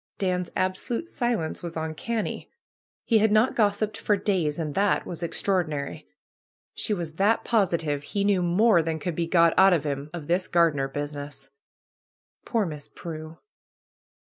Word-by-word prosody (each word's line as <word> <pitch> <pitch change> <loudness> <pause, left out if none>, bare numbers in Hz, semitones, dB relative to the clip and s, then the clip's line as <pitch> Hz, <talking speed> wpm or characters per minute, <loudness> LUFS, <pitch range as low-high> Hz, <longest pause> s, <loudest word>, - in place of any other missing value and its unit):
Dan's 180 -2 -1
absolute 190 - -2
silence 240 - -2
was 170 -1 -6
uncanny. 160 +8 -3 0.5
He 225 -3 +3
had 215 0 +3
not 215 +4 +3
gos 205 -3 +3
siped 215 0 -2
for 205 - +1
days, 180 -7 0
and 155 -3 -3
that 200 +3 +1
was 170 -1 -6
extraordinary. 170 -5 -1 0.7
She - - -4
was 170 -5 -3
that 210 +4 +3
positive 170 -10 +1
he 200 +7 -2
knew 200 -2 +3
more 180 +2 +4
than 160 0 -2
could 165 +1 -4
he 170 - 0
got 170 -1 +4
out 190 -1 +7
of 165 -5 +1
him 140 0 -3
of 170 -3 -7
this 180 +4 +1
^^gardener 155 -6 +2
business." 145 -1 -6 1.0
Poor 225 -4 +1
Miss 150 -4 -7
Prue 155 -1 -8
175 Hz, 155 wpm, -26 LUFS, 155-205 Hz, 1.0 s, out